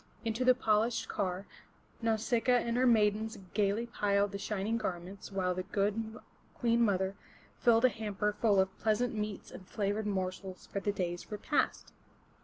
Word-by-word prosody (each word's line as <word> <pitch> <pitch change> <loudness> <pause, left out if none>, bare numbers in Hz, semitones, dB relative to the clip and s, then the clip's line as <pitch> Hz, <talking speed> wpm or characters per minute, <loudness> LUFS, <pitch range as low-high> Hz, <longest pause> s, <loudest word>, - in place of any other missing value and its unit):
Into 225 +2 0
the 255 0 +6
polished 220 0 +1
car, 190 0 -2 0.6
Nau 225 -1 +2
sic'a 230 +3 0
a - - +3
and 235 0 -1
her 255 +1 +3
maidens 220 -1 +3 0.2
gaily 210 +2 +1
piled 205 -3 +1
the 200 - -5
shining 210 +3 -1
garments, 190 -1 -5
while 185 -2 0
the 185 - -2
good 210 +4 -1 0.4
Queen 235 -1 +2
mother 190 -3 +2 0.4
filled 235 0 +5
a - - +7
hamper 210 -2 -2
full 210 -2 +3
of 190 0 +1
pleasant 225 +4 +1
meats 210 -2 -4
and 185 - -11
flavored 205 +1 -1
morsels 190 -1 -3
for 200 - -4
the 205 - 0
day's 175 -3 -3
repast. 210 +8 -1
210 Hz, 165 wpm, -32 LUFS, 195-225 Hz, 0.6 s, a